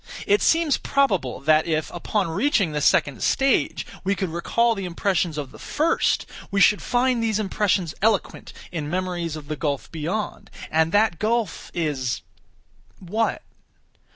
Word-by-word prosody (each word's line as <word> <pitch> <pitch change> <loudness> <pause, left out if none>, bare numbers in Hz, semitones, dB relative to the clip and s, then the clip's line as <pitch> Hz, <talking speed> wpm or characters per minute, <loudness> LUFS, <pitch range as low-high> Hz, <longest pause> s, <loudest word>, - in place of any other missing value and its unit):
It 410 +1 +3
seems 325 -3 +3
probable 195 - 0
that 155 +3 +3
if, 155 -1 -1
upon 190 +2 -1
reaching 195 - +1
the 150 0 -2
second 140 -2 +2
stage, 270 0 +1 0.2
we 195 +1 +1
could 190 -1 -2
recall 230 +8 +1
the 195 -3 -5
impressions 175 -2 0
of 140 -3 -5
the - - -14
first, 320 +3 +1 0.2
we 200 - 0
should 205 +1 +5
find 245 -1 +1
these 220 -2 +1
impressions 195 -5 0
eloquent 220 +2 0 0.2
in 155 -4 -4
memories 175 -2 -2
of 150 -2 -9
the 155 - -3
gulf 145 -1 -3
beyond. 170 +7 -4 0.2
And 160 +1 +2
that 205 -4 +2
gulf 220 -4 -1
is—what? 170 - -4
185 Hz, 145 wpm, -23 LUFS, 155-220 Hz, 0.2 s, should